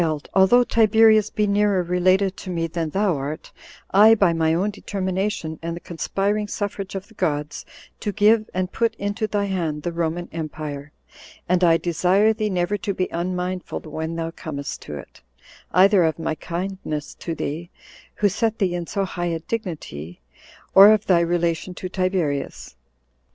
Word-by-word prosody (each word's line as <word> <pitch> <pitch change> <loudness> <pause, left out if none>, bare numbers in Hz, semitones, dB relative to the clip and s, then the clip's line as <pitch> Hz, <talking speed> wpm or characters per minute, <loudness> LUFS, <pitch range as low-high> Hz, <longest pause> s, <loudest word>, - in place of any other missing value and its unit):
although 195 +6 +5
Tiberius 220 -2 +4
be 210 - 0
nearer 200 -2 +2
related 185 +2 +2
to 185 - -8
me 170 -2 -1
than 165 -1 -3
thou 195 +1 +1
art, 140 +3 -6 0.4
I, 215 +3 +7
by 195 -5 +3
my 160 -1 +1
own 185 +6 +1
determination, 190 -4 -3
and 165 0 -4
the - - -7
conspiring 200 +5 -2
suffrage 200 -1 -4
of 195 +1 -5
the 225 - -19
gods, 150 -6 -2 0.3
do 205 - -2
give 215 +1 +3
and 185 0 -2
put 230 -1 0
into 205 +1 -2
thy 205 -1 -1
hand 165 -6 -2
the 175 - -2
Roman 170 +1 -2
empire; 150 -2 -6 0.6
and 180 +1 +2
I 165 -1 +5
desire 185 +6 +2
thee 215 -1 -2
never 180 +1 0
to 205 -2 -3
be 185 - -1
unmindful 180 +1 -3
when 160 +1 -5
thou 165 0 -3
comest 140 -4 -6
to - - -5
it, - - -12 0.5
either 190 +1 +5
of 160 -1 +1
my 165 - -2
kindness 170 -3 -5
to 165 - -4
thee, 160 +4 -4 0.5
who 210 - +2
set 220 +3 0
thee 190 -4 0
in 175 -1 -4
so 200 -1 -1
high 175 -1 -3
a 165 -1 -2
dignity, 155 - -6 0.5
or 200 +2 +10
of 215 -1 +2
thy 180 -3 +4
relation 170 +1 -1
to 185 - -5
Tiberius. 180 -7 -2
180 Hz, 165 wpm, -22 LUFS, 165-205 Hz, 0.6 s, or